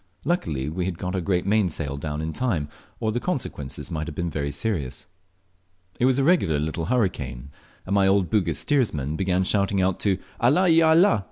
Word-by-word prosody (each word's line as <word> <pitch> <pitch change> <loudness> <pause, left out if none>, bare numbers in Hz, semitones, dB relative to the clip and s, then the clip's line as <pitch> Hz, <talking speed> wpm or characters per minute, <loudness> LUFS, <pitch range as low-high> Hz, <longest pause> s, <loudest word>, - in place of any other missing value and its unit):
Luckily 80 - -1
we 90 +4 -2
got 90 +1 -4
our 95 - -1
great 90 0 0
mainsail 90 -9 0
down 75 +1 -4
in 80 0 -3
time, 90 - -1 0.3
or 110 - 0
the 120 - -1
consequences 120 - -4
might 80 0 -3
have 80 - -6
been 75 -4 -2
serious. 75 - -3 0.9
It 120 - +3
was 130 0 +3
a 135 - +2
regular 140 - +3
little 80 +2 -2
hurricane, 80 - -1 0.3
and 100 - -2
my 100 -1 +4
old 95 -3 +2
Bugis 90 -8 +1
steersman 75 - 0
began 95 +1 +1
shouting 100 0 +1
out 95 0 +1
to 100 -3 +1 0.2
"Allah! 150 +11 +4
il 165 0 +5
Allah!" 160 - +5
95 Hz, 180 wpm, -24 LUFS, 75-110 Hz, 0.9 s, il